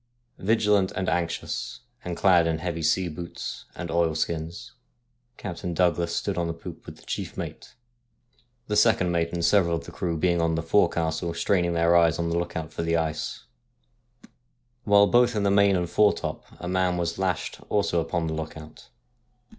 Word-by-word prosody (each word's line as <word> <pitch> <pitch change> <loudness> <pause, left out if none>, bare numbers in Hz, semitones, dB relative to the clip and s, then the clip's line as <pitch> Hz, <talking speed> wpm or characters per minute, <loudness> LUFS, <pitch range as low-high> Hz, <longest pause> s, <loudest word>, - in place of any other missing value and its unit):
Vigilant 105 -2 +2
and 95 - -2
anxious, 85 -1 -2 0.2
and 90 -1 -4
clad 90 -4 +4
in 80 -1 0
heavy 85 0 -3
sea 90 +4 +2
boots 85 +1 -7
and 85 -2 -5
oil 85 -1 +1
skins, 80 +1 -3 0.7
Captain 90 -3 -5
Douglas 85 -1 +1
stood - - -1
on 85 - 0
the 85 - -3
poop 80 - -10
with - - -8
the - - -19
chief - - -5
mate; - - -7 0.9
the 105 - -2
second 105 -4 +4
mate 85 -1 0
and 85 -1 -1
several 85 -2 +3
of 80 - -5
the - - -9
crew 85 -2 -2
being 85 +1 +2
on 80 0 +1
the 80 - -2
fore 90 +5 +3
castle 85 +1 -2
straining 85 -1 +1
their 85 +1 +3
eyes 85 -1 +4
on 85 0 -1
the 85 - 0
look 85 0 -4
out 80 -1 -5
for - - -3
the 85 0 +1
ice, 80 -2 -3 1.4
while 100 -1 +6
both 120 +2 +3
in 105 - 0
the 100 - +2
main 100 0 +4
and 90 -1 0
foretop 105 +3 +1
a 90 - -6
man 90 -1 +1
was 85 0 -2
lashed 95 -3 -2
also 100 -5 +1
on 85 -2 -1
the 80 - -2
look 80 0 -5
out. 75 0 -13
85 Hz, 185 wpm, -26 LUFS, 85-95 Hz, 1.4 s, while